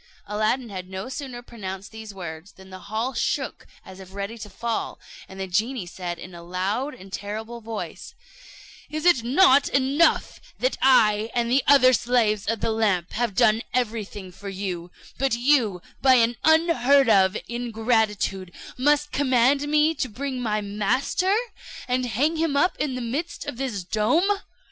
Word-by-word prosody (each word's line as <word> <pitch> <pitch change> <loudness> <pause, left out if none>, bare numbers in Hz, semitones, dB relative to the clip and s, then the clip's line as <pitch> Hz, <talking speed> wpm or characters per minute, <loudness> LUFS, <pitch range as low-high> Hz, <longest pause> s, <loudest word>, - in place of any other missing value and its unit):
Aladdin 215 +4 -1
had 185 -2 -7
no 190 +5 -6
sooner 260 -2 -6
pronounced 195 -5 -7
these 220 -1 -9
words, 175 -1 -8
than 190 0 -16
the 185 - -9
hall 225 +5 -2
shook - - -2 0.2
as 190 0 -12
if 190 0 -12
ready 200 +3 -4
to 210 -2 -9
fall; 230 +3 -3 0.3
and 190 - -11
the 190 - -2
genie 215 +4 -1
said 175 0 -6
in 180 +2 -10
a 170 - -10
loud 195 +11 -2
and 190 +1 -14
terrible 220 +4 -5
voice, 220 -1 -7 0.7
"Is 310 +1 -4
it 305 -10 +5
not 275 +2 +5
enough 275 +5 +2 0.2
that - - 0
I 220 -4 +4
and 235 -1 0
the 265 +2 +3
other 255 -2 +7
slaves 225 -4 +1
of 225 0 -1
the - - 0
lamp 205 -6 0
have 235 -4 -2
done 215 +2 +4
everything 210 -6 -3
for 200 +2 -9
you, 185 -3 -5 0.3
but 270 -3 +1
you, 235 -8 +2 0.2
by 260 -1 +6
an 235 0 +3
unheard 295 -5 +4
of 190 -3 +4
ingratitude, 220 -5 -1 0.3
must 295 +2 +2
command 275 +1 +2
me 300 +2 +3
to 260 -5 -3
bring 260 +3 -4
my 215 -3 -1
master, 215 - 0 0.5
and 250 0 0
hang 290 +8 0
him 315 -3 0
up 360 +6 +2
in 285 -4 -1
the 255 - -4
midst 285 +10 -4
of 290 -5 -6
this 245 -8 -3
dome? 315 - +1
230 Hz, 165 wpm, -24 LUFS, 200-265 Hz, 0.7 s, other